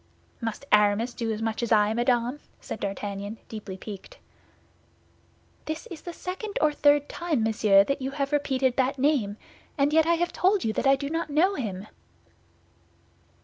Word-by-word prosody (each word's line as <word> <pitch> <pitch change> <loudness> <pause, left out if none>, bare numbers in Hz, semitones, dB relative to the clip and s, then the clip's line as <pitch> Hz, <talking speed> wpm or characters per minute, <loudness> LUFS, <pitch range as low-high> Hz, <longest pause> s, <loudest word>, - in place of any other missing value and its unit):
"Must 225 +4 -4
Aramis 210 +3 +3
do 230 -1 -2
as 220 0 -3
much 225 0 -2
as 235 - -2
I, 210 -1 +4
madame?" 240 +3 +1 0.2
said - - -7
D'Artagnan, 200 +1 -4
deeply 205 -4 -7
piqued. 200 0 -9 1.5
"This 315 +1 -4
is 320 -3 -8
the 350 - -7
second 375 +5 -5
or 305 -1 +3
third 290 0 +3
time, 325 -9 -1
monsieur, 210 -3 +4
that 275 +5 -2
you 265 - -2
have 275 0 -3
repeated 265 -3 +1
that 265 +1 +1
name, 255 -7 +1 0.4
and 285 +1 +2
yet 320 0 +4
I 340 - +4
have 345 +1 -1
told 385 +2 +2
you 220 - 0
that - - 0
I 270 - +6
do 280 +1 -5
not 330 -1 -2
know 330 +7 +3
him." 205 - -4
260 Hz, 170 wpm, -26 LUFS, 215-300 Hz, 1.5 s, I